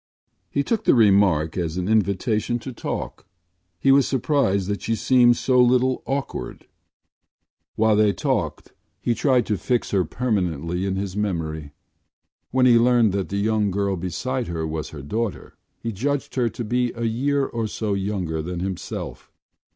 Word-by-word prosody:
” - - -49
He 140 - 0
took 225 +7 -1
the - - +5
remark 100 -8 +4
as 85 -1 -2
an 90 0 -2
invitation 110 +2 +1
to 130 +2 -8
talk. - - -5 0.5
He 135 - +4
was 140 0 +5
surprised 125 -8 +1
that 100 0 -2
she 115 - -1
seemed 120 0 +4
so 125 -1 +3
little 125 +1 +3
awkward. 135 0 -4 1.1
While 110 -1 +3
they 105 -1 +4
talked 110 - -2 0.3
he 120 - 0
tried 125 0 +2
to 105 -4 -1
fix 120 +6 -1
her 95 -2 +2
permanently 90 - -2
in 95 - -1
his 95 -1 -4
memory. 80 -8 -3 0.8
When 130 0 +2
he 120 -2 +6
learned 120 -3 +4
that 95 -1 -2
the 100 - -2
young 105 0 +1
girl 100 0 0
beside 115 +9 -3
her 80 -2 -3
was 80 -1 -4
her 75 -3 -9
daughter 110 +6 -3 0.2
he 115 - -4
judged 135 +7 -2
her 125 -3 +1
to 115 +2 -6
be 120 +2 0
a 115 - -4
year 135 +5 +1
or 115 -3 -3
so 105 -1 -2
younger 95 -5 -2
than 85 +2 -5
himself. 95 0 -5
105 Hz, 165 wpm, -23 LUFS, 95-125 Hz, 1.1 s, he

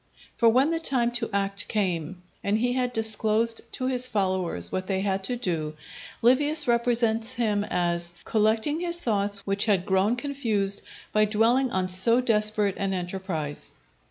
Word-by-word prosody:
For 230 - +4
when 260 +7 +3
the 330 - -1
time 250 -6 +1
to 235 -1 -2
act 200 0 -1
came, 180 -4 -2 0.2
and 205 +1 +1
he 245 +2 0
had 250 -1 -1
disclosed 225 0 +1
to 255 - -3
his 255 -1 +2
followers 185 - -1
what 185 0 -3
they 190 0 -1
had 195 -1 -1
to 245 - -2
do, 165 -10 -3 0.5
Livius 290 +5 +4
represents 235 -1 +1
him 215 -4 0
as 170 -2 -1
"collecting 220 +8 +1
his 345 0 -1
thoughts 205 -7 -1
which 200 +1 0
had 195 -5 +1
grown 195 +4 +2
confused 230 -7 -2 0.3
by 215 0 +4
dwelling 230 +5 +2
on 185 -4 -1
so 190 +6 +4
desperate 215 -4 +2
an 195 -1 -1
enterprise." 175 -5 -4
215 Hz, 155 wpm, -25 LUFS, 190-245 Hz, 0.5 s, For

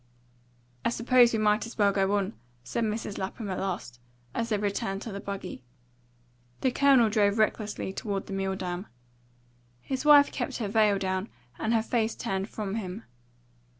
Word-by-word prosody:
"I - - +2
suppose 240 +1 +4
we 225 - 0
might 215 0 +2
as 230 - -11
well 205 -2 +4
go 195 +1 +2
on," 195 -2 -2 0.3
said 180 - -2
Mrs. 215 -1 -3
Lapham 195 +2 -4
at 185 - -2
last, 175 -11 -4 0.3
as 230 0 -2
they 215 - +2
returned 200 -1 -2
to 225 - -6
the 200 - -5
buggy. 195 -9 -6 1.0
The 260 - +2
Colonel 270 -3 +5
drove 210 -1 +2
recklessly 215 -2 0
toward 200 -1 -3
the - - -7
Milldam. 190 -1 -3 0.9
His 260 - -4
wife 295 -1 +7
kept 265 0 -3
her 220 - -2
veil 210 -1 +3
down 190 +1 -2 0.3
and 220 - 0
her 225 -1 +3
face 225 -1 0
turned 195 +2 -3
from 210 -1 -4
him. 200 +1 -5
210 Hz, 165 wpm, -28 LUFS, 195-230 Hz, 1.0 s, wife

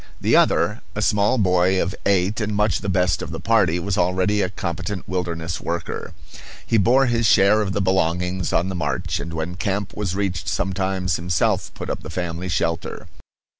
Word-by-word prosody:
The - - +2
other, - - +3
a - - -2
small 105 +4 +2
boy 95 -2 +3
of 90 - -1
eight, 100 +2 +1
and 105 0 -1
much 105 -2 +1
the 100 - -3
best 90 -2 +1
of - - -5
the - - -5
party, 105 -7 +2
was 95 +2 -2
already 95 +3 +1
a 95 - 0
competent 95 +1 -4
wilderness 85 -3 -3
worker. 85 -1 -4 0.5
He 115 - +2
bore 130 +7 +4
his 115 -2 +2
share 105 +2 +5
of 95 -2 -2
the 100 - 0
belongings 90 -1 0
on 90 +3 +1
the - - -3
march, 75 -7 -2
and 85 - -6
when 80 +2 -3
camp 100 +1 -2
was 100 -4 -2
reached 95 -4 -2
sometimes 95 -1 -1
himself 85 0 0
put - - -6
up - - -3
the - - -9
family 85 +1 -4
shelter. 85 -1 -2
95 Hz, 185 wpm, -22 LUFS, 85-100 Hz, 0.5 s, share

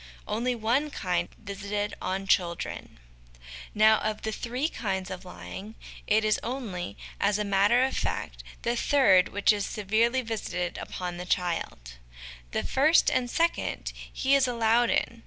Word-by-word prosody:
Only 240 +4 0
One 240 +7 +1
Kind 180 -9 -1
visited 205 0 -4
on 190 +1 -2
Children. 170 - -1 0.8
Now, 215 +1 +6
of 215 0 -3
the 220 - -1
three 250 +6 -2
kinds 190 - -3
of 185 0 -7
lying, 200 +4 -9 0.3
it 215 +1 +3
is 215 -1 +2
only, 215 - -5 0.2
as 200 0 +2
a 210 - 0
matter 200 +5 +4
of 265 - 0
fact, - - -3 0.2
the 235 +1 0
third 230 -9 +4
which 205 +2 +3
is 205 -1 -2
severely 225 +6 +1
visited 180 -6 -3
upon 180 -1 -5
the 180 - -6
child; 165 - -2 0.5
the - - -2
first 305 +5 +4
and 245 -1 0
the - - -7
second 335 +1 0 0.2
he 270 +1 +1
is 275 -2 +5
allowed 235 0 +2
in. 230 - 0
215 Hz, 155 wpm, -28 LUFS, 190-240 Hz, 0.8 s, Now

